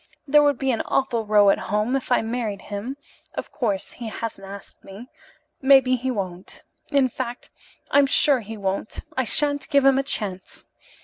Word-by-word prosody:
There 295 +2 +6
would 290 -2 +3
be 270 0 0
an 230 - 0
awful 235 -5 0
row 205 -1 +6
at - - 0
home 210 +5 +1
if 270 - -3
I 245 - +3
married 225 -3 -3
him. 210 +7 -5 0.4
Of - - -5
course, 205 -8 -2
he 235 - -8
hasn't 215 -3 -6
asked 200 0 -11
me. 205 +6 -11 0.5
Maybe 265 -2 +5
he 255 +1 -3
won't. 185 -6 -5 0.3
In 280 -3 +4
fact, 245 0 -6 0.4
I'm 285 -1 +5
sure 275 0 +4
he 220 0 -8
won't. 195 +1 -3
I 260 - 0
shan't 285 +4 0
give 280 -2 +3
him 270 0 +5
a - - 0
chance. 200 -9 -5
240 Hz, 180 wpm, -23 LUFS, 205-270 Hz, 0.5 s, There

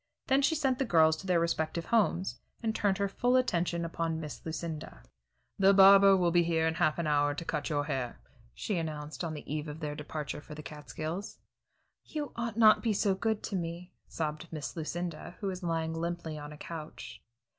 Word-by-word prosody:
Then 270 +1 +3
she 280 +4 +3
sent 270 -4 +1
the - - +3
girls 160 -6 +5
to 190 - -9
their 180 -2 +3
respective 165 0 -1
homes, 200 -5 +1 0.2
and 220 -1 +1
turned 200 -3 +1
her 200 0 +1
full 245 +6 +1
attention 170 -8 +1
upon 165 -1 -2
Miss 150 -3 -7
Lucinda. 160 - -5 0.6
"The 195 0 +6
barber 195 0 +8
will 175 -2 +2
be 175 0 +5
here 165 -1 +1
in 160 - +2
half 160 -2 +1
an 170 - -1
hour 145 -1 +2
to 165 - -5
cut 150 -1 -2
your 145 -2 +1
hair," 130 -5 -3 0.4
she 205 - -2
announced 155 0 -5
on 160 -2 -3
the 150 - -8
eve 150 +1 -3
of 150 +1 -7
their 150 -2 -3
departure 150 0 -5
for 150 +1 -10
the 150 - -8
Catskills. 155 +5 -6 0.7
"You 295 -3 -5
ought 235 -2 -3
not 215 -2 +7
to - - -12
be 225 -3 +1
so 200 0 +2
good 220 +2 -1
to 200 - -3
me!" 175 0 -4
sobbed 155 +1 -4
Miss 150 -4 -5
Lucinda, 175 +1 -4
who 205 - -5
was 190 -1 -3
lying 165 -2 -1
limply 170 -1 -3
on 150 0 -7
a 150 - -10
couch. 160 0 -8
170 Hz, 205 wpm, -31 LUFS, 155-195 Hz, 0.7 s, barber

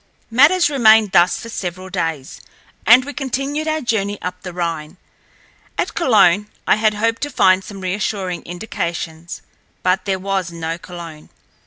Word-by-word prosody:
Matters 300 +9 +5
remained 220 -7 +5
thus 175 0 +4
for 230 - -9
several 185 -2 -5
days, 165 -7 -3 0.5
and 250 +3 +7
we 285 - -6
continued 275 +3 -3
our 310 0 0
journey 205 -4 -1
up 180 0 -5
the 180 - -7
Rhine. 170 -1 -4 0.8
At - - -1
Cologne, 210 - +3 0.2
I - - +3
had 215 -1 +2
hoped 230 +2 0
to 290 - -2
find 190 -8 +3
some 195 -1 -9
reassuring 185 -1 -2
indications, 170 -3 -5 0.4
but 185 +2 +1
there 195 -2 0
was 190 -2 -2
no 165 0 -4
Cologne. 170 -3 -10
195 Hz, 150 wpm, -19 LUFS, 175-230 Hz, 0.8 s, and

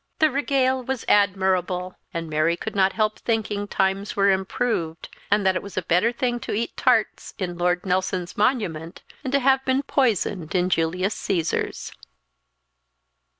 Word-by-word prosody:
The 310 -1 +3
regale 265 -2 +1
was 260 -1 -4
admirable, 185 -2 +1 0.2
and 165 -1 -4
Mary 155 +2 +1
could - - -6
not 190 -1 +3
help 215 -1 0
thinking 210 -3 -1
times 195 +1 -1
were 200 0 +4
improved, 190 -4 -2 0.2
and 205 0 +2
that 190 -1 +3
it - - -1
was 200 -2 -10
a 185 - 0
better 180 +8 +2
thing 240 0 -1
to - - -5
eat 230 +3 -2
tarts - - +1
in 180 -3 -3
Lord 175 +1 +1
Nelson's 185 -1 -1
Monument 190 - -1 0.2
than 265 - -4
to 280 - +3
have 265 0 +3
been 265 +1 +1
poisoned 205 - 0
in 180 0 +1
Julius 180 +5 +1
Caesar's. 170 -4 -2
195 Hz, 155 wpm, -24 LUFS, 180-235 Hz, 0.2 s, were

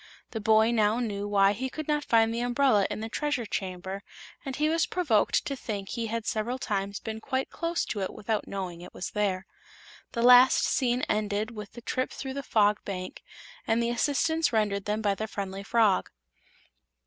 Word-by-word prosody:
The 225 - -4
boy 220 +2 +4
now 215 -1 +2
knew 205 -4 -2
why 200 -1 +4
he 260 +5 -3
could 310 +3 -6
not 295 -1 +1
find 225 -2 +3
the 230 - -2
umbrella 245 -4 +3
in - - -4
the 220 - -3
Treasure 255 0 -2
Chamber, 190 -1 -4 0.4
and 270 -1 -4
he 300 +2 +1
was 325 0 +2
provoked 295 -13 +2
to 275 - -2
think 205 -6 -5
he 230 -2 -3
had 225 0 -3
several 225 +4 -1
times 200 -4 -2
been 220 0 -6
quite 260 +3 -2
close 335 0 -1
to 210 - -4
it 190 - -2
without 215 0 -3
knowing 185 -3 -5
it 175 - -12
was 180 - -5
there. 195 -3 -1 0.7
The 235 - -1
last 250 +1 +7
scene 250 -1 +1
ended 210 +1 -1
with 210 -3 -9
the 240 - -10
trip 255 +2 -2
through 265 -1 -6
the 280 - -3
Fog 210 -5 +2
Bank 185 -2 -6 0.5
and 225 - +2
the 235 0 +1
assistance 305 +6 +1
rendered 205 -3 0
them 210 +1 -1
by 205 -1 +2
the 215 +2 -4
friendly 195 -2 -5
frog. 215 -1 +2
220 Hz, 195 wpm, -28 LUFS, 205-250 Hz, 0.7 s, last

